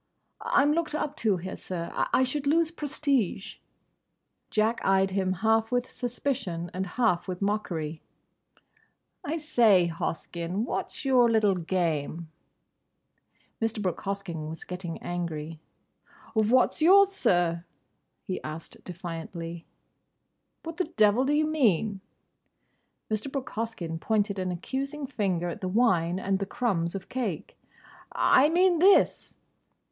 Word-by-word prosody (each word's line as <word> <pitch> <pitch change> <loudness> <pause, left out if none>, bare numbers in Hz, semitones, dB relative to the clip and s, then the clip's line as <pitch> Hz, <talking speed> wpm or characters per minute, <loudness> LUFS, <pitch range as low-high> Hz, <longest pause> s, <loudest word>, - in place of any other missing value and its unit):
"I'm 285 +1 +3
looked 320 -2 -1
up 300 -1 -2
to 210 -4 +1
here, 185 +2 -6
sir. 170 -2 -5
I 260 - +2
should 280 +2 -2
lose 325 +2 +3
prestige." 280 - -1 0.9
Jack 220 +2 +1
eyed 195 0 +3
him 190 -1 0
half 225 +1 +3
with 245 0 -1
suspicion 235 -9 -3
and 190 +2 -3
half 225 -9 +2
with 180 -1 -4
mockery. 170 -7 -2 1.2
"I 315 +3 -2
say, 230 - +4
Hoskyn, 170 +4 -3
what's 275 - -4
your 250 -3 +5
little 215 -3 +3
game?" 165 -3 -2 1.3
Mr. 225 -1 -1
Brooke 185 -5 -2
Hoskyn 185 -6 -4
was 160 - -7
getting 180 -2 -6
angry. 165 -3 -4 0.7
"What's 230 +7 +3
yours, 390 +4 +7
sir?" 175 - +1 0.6
he 185 - -4
asked 155 +2 -8
defiantly. 170 -1 -7 1.0
"What 330 0 -7
the 365 - +1
devil 215 +4 +3
do 285 - +1
you 305 +1 +3
mean?" 220 - +1 1.1
Mr. 215 +5 -2
Brooke 270 -2 -4
Hoskyn 215 -8 -4
pointed 205 0 0
an 185 -1 -1
accusing 275 - -4
finger 190 -9 -1
at 170 - -5
the 185 - -2
wine 185 -5 +2
and 195 0 0
the 195 - -3
crumbs 195 -7 -1
of 190 -1 -6
cake. 230 -11 -4 0.6
"I 285 +3 +4
mean—this." 360 +2 +4
200 Hz, 125 wpm, -27 LUFS, 175-260 Hz, 1.3 s, yours